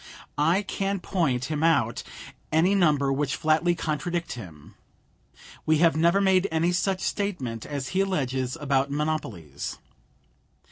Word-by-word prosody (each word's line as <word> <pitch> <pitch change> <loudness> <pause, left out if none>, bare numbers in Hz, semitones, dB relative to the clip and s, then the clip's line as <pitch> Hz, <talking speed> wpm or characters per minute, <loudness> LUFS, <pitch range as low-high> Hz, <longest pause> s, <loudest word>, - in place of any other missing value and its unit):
I 170 +7 +3
can 195 0 -2
point 140 -10 0
him 150 0 -3
out 140 -9 +2 0.5
any 165 +5 +3
number 150 -8 +3
which 140 0 -1
flatly 160 +3 +2
contradict 165 +2 -2
him. 85 -11 -10 0.9
We 155 0 +4
have 165 0 +4
never 170 +4 +3
made 190 -1 +3
any 165 +2 +2
such 185 +1 0
statement 135 - -3
as 140 -3 -4
he 185 - -1
alleges 135 -9 -1
about 140 -2 +1
monopolies. 140 - -3
155 Hz, 130 wpm, -26 LUFS, 135-175 Hz, 0.9 s, We